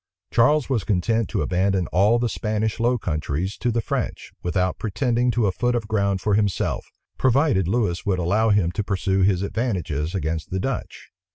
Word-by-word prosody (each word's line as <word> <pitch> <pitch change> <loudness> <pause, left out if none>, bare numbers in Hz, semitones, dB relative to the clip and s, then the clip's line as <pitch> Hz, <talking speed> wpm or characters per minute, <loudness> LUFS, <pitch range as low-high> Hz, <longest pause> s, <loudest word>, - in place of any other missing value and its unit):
Charles 145 +4 +4
was 125 -6 0
content 110 +3 0
to - - -1
abandon 95 0 +1
all 100 +6 +4
the 120 0 0
Spanish 110 0 -2
Low 120 +2 +2
Countries 80 0 -2
to 120 - 0
the 115 0 0
French, - - -3
without 90 +1 -1
pretending 120 +2 0
to 120 -2 +1
a 100 - +2
foot 120 +5 0
of 115 -3 -2
ground 100 -3 0
for 105 - 0
himself, 100 -2 0 0.3
provided 130 - +3
Lewis 100 -4 0
would 95 -2 0
allow 100 +6 +2
him 100 -5 +3
to 105 - -2
pursue 95 -1 0
his 95 -1 +2
advantages 90 - -2
against 80 -2 -2
the 95 - -2
Dutch. 135 +6 -5
100 Hz, 180 wpm, -23 LUFS, 95-115 Hz, 0.3 s, Charles